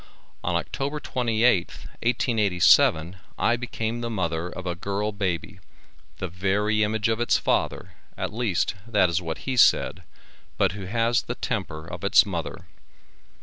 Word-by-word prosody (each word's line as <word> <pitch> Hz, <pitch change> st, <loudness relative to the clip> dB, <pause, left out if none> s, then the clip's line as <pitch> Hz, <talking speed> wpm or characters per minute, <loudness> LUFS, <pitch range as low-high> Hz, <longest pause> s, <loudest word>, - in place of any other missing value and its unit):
On -, -, 0 dB
October 140 Hz, +2 st, -2 dB
28th, 115 Hz, -7 st, +1 dB, 0.2 s
1887, 100 Hz, -7 st, +3 dB, 0.2 s
I 120 Hz, -, +2 dB
became 120 Hz, -1 st, -4 dB
the 120 Hz, -, -3 dB
mother 85 Hz, -6 st, -2 dB
of 95 Hz, +1 st, -8 dB
a 90 Hz, -, -1 dB
girl 100 Hz, +4 st, -2 dB
baby, 100 Hz, -1 st, -3 dB, 0.6 s
the 95 Hz, -, -3 dB
very 100 Hz, +4 st, 0 dB
image 110 Hz, +1 st, +1 dB
of 115 Hz, 0 st, 0 dB
its 120 Hz, -, +3 dB
father, -, -, -1 dB, 0.2 s
at -, -, -3 dB
least 110 Hz, -6 st, 0 dB
that 105 Hz, -6 st, +3 dB
is 85 Hz, +2 st, 0 dB
what 80 Hz, -2 st, -6 dB
he 130 Hz, -, -1 dB
said, 125 Hz, -, +4 dB, 0.6 s
but -, -, +3 dB
who 95 Hz, +1 st, -7 dB
has 115 Hz, +4 st, +1 dB
the 125 Hz, -, -5 dB
temper 80 Hz, -10 st, -4 dB
of 85 Hz, +1 st, -8 dB
its 100 Hz, -, +6 dB
mother. 85 Hz, -5 st, -5 dB
105 Hz, 150 wpm, -25 LUFS, 90-115 Hz, 0.6 s, its